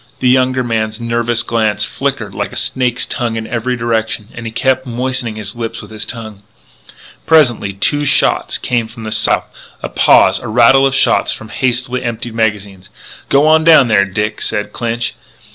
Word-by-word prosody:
The 125 - +2
younger 130 0 +2
man's 110 -2 -2
nervous 115 0 -1
glance 110 -2 0
flickered - - -3
like - - -4
a - - -10
snake's 125 -2 -1
tongue 120 -2 -3
in 110 0 -4
every 120 +2 -2
direction, 110 -2 -2
and 115 -1 -7
he - - -5
kept 130 +2 0
moistening 125 -1 -3
his 110 +1 -7
lips 115 -1 -5
with 105 0 -11
his 110 - -6
tongue. 110 -4 -8 0.9
Presently 125 -11 +3
two 145 +9 0
shots 140 - +1
came 120 -3 -1
from 115 0 -11
the 110 - -5
south. 110 0 +1 0.4
A - - -3
pause; - - +4
a - - -8
rattle 125 +4 +5
of 135 - -2
shots - - +2
from 110 - -10
hastily 125 +1 -1
emptied 120 -1 -4
magazines. 100 -4 -2 0.4
"G'wan 155 +3 +4
down 155 -6 +6
there, 100 -3 +4
Dick!" 105 +2 -3
said 105 -1 -3
Clinch. 115 -1 -2
115 Hz, 175 wpm, -15 LUFS, 110-125 Hz, 0.9 s, down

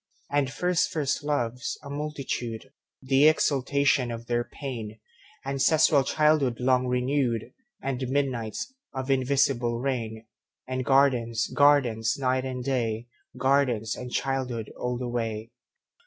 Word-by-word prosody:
And 140 -2 +1
first 180 +4 +1
first 145 -2 -1
loves, 125 -4 -2
a 140 - -8
multitude, 135 -5 -4 0.3
The 135 +3 +5
exaltation 140 -3 +2
of 115 0 -6
their 120 0 0
pain; 115 -6 -7 0.5
Ancestral 140 +1 +4
childhood 150 -4 +2
long 125 0 +2
renewed; 125 -2 0 0.3
And 135 -1 -2
midnights 130 - -2 0.2
of 130 +1 -2
invisible 130 -3 +2
rain; 115 -4 -3 0.4
And 130 0 -2
gardens, 125 -4 +3
gardens, 125 -6 +3
night 130 -1 0
and 130 -1 -4
day, 120 -3 -1 0.3
Gardens 125 -4 +1
and 125 -1 -7
childhood 130 -5 -2
all 125 0 -2
the 125 0 -4
way. 115 -2 -3
130 Hz, 120 wpm, -27 LUFS, 120-140 Hz, 0.5 s, The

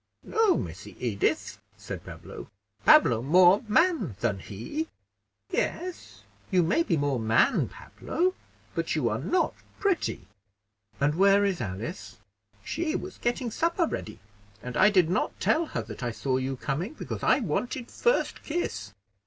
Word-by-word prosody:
"No, 440 -4 +3
Missy 90 +5 -6
Edith," 110 -5 -1 0.2
said - - -7
Pablo; - - -10 0.4
"Pablo 115 -1 +6
more 180 - +6
man 320 - +2
than 105 -4 0
he." 115 - -5 0.6
"Yes, 365 0 -3 0.3
you 185 -3 +3
may 190 - +2
be 180 - +1
more 140 -3 0
man, 110 0 +3
Pablo; 370 +2 -2 0.4
but - - -1
you - - +1
are - - -1
not 365 - +1
so - - -26 0.2
pretty." 395 -4 0 0.7
"And 145 +1 +2
where 200 +3 +5
is 190 -8 -1
Alice?" 100 0 -5 0.5
"She 325 +1 -2
was 380 - -5
getting 240 0 -1
supper 335 - +1
ready, 110 - -5 0.5
and 125 -1 -6
I 210 - +6
did 185 -5 +4
not 180 - -1
tell 325 +1 +2
her 115 - -3
that 105 -1 -9
I 120 - -1
saw 130 +3 -1
you 130 0 -2
coming, 155 - -3
because - - -6
I - - +4
wanted 245 - -2
first 485 +1 +1
kiss." 110 - -3
180 Hz, 150 wpm, -27 LUFS, -, 0.7 s, Pablo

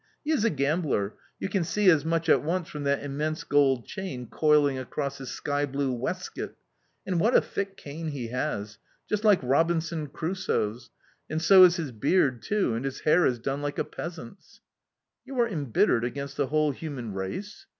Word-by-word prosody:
He 310 - 0
is 295 -9 +2
a 230 - +4
gambler; 140 - 0 0.3
you - - -2
can 190 -2 0
see 205 +4 0
as 155 -4 +3
much 165 0 0
at - - +5
once 170 +2 -1
from 150 -1 -6
that 140 0 +1
immense 150 +3 -2
gold 135 -4 +3
chain 140 -11 -6
coiling 145 0 +3
across 140 +1 -4
his 135 -2 -7
skyblue 140 -2 -1
waistcoat. 120 - -4 0.5
And 180 -3 0
what 225 +8 +3
a - - +9
thick 200 -1 -4
cane 155 +3 -7
he 135 -6 -4
has! 115 -5 -3 0.3
Just 210 0 -1
like 210 -3 +6
Robinson 165 +3 +1
Crusoe's 150 - -2 0.4
and 155 - -1
so 185 +3 +8
is 175 -1 +4
his 160 -7 -3
beard 130 - +2
too, 205 - 0
and 115 +3 -2
his 135 -1 -4
hair 170 +3 +4
is 125 - 0
done 135 +4 -3
like 145 0 -3
a - - +1
peasant's." 170 0 -9 0.6
"You 265 -1 -6
are 235 - +4
embittered 140 - +1
against 140 +3 -4
the 140 - 0
whole 155 +1 +2
human 135 -7 -6
race?" 95 - -6
150 Hz, 180 wpm, -27 LUFS, 135-170 Hz, 0.6 s, a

